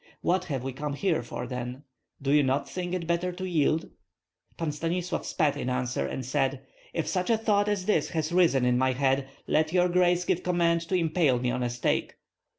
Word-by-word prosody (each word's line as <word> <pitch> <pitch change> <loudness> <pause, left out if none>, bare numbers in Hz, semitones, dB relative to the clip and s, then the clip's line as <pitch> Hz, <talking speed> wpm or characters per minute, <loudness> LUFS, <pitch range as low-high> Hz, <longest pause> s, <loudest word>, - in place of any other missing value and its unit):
"What 185 +1 +1
have 135 -7 -3
we 135 0 -4
come 145 +2 -4
here 165 -2 0
for, 120 +1 -6
then? 125 +2 -5 0.4
Do 140 0 -1
you 150 0 +6
not 135 +1 0
think 180 0 -3
it 175 -2 -3
better 170 +2 0
to 185 +1 -5
yield?" 160 -2 +1 0.7
Pan 165 -2 -1
Stanislav 170 +3 -2
spat 150 -4 +1
in 125 - -3
answer, 125 -1 -1
and 130 - -4
said: 135 0 -1 0.3
"If 165 - -2
such 185 +1 -1
a 230 - +4
thought 210 -2 +2
as 200 -3 -1
that 210 - +2
has 160 -2 -2
risen 170 -8 +4
in 125 0 +3
my 130 0 +2
head, 135 +1 +1 0.2
let 155 0 +1
your 180 -1 +4
grace 180 0 +3
give 175 - +1
command 170 -2 +2
to 190 - +1
impale 160 -6 +2
me 125 0 0
on 125 +1 -2
a 120 - 0
stake. 120 0 -1
155 Hz, 210 wpm, -28 LUFS, 130-180 Hz, 0.7 s, you